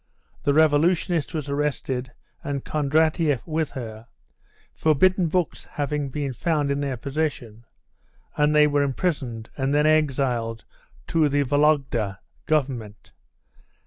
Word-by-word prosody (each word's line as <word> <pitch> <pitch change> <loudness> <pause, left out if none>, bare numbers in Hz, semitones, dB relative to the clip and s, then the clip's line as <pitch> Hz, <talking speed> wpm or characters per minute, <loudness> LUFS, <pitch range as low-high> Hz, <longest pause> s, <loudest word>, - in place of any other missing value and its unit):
The 140 - +3
revolutionist 160 +2 +2
was 150 -3 -3
arrested, 140 -3 -2 0.3
and 140 -2 -4
Kondratieff 155 -1 +1
with 160 -2 -1
her, 110 -2 -7 0.7
forbidden 180 +4 +3
books 175 0 -1
having 145 -1 -3
been 140 -1 -3
found 150 0 0
in 140 - 0
their 135 -3 -2
possession, 125 -4 -4 0.7
and 150 0 +2
they 150 0 +7
were 145 -1 +2
imprisoned 135 -6 -2
and 135 +1 0
then 150 +1 +3
exiled 130 -7 +1 0.4
to 160 -3 +3
the 145 0 +2
Vologda 135 -8 +1 0.3
Government. 125 - -2
145 Hz, 115 wpm, -24 LUFS, 130-155 Hz, 0.7 s, they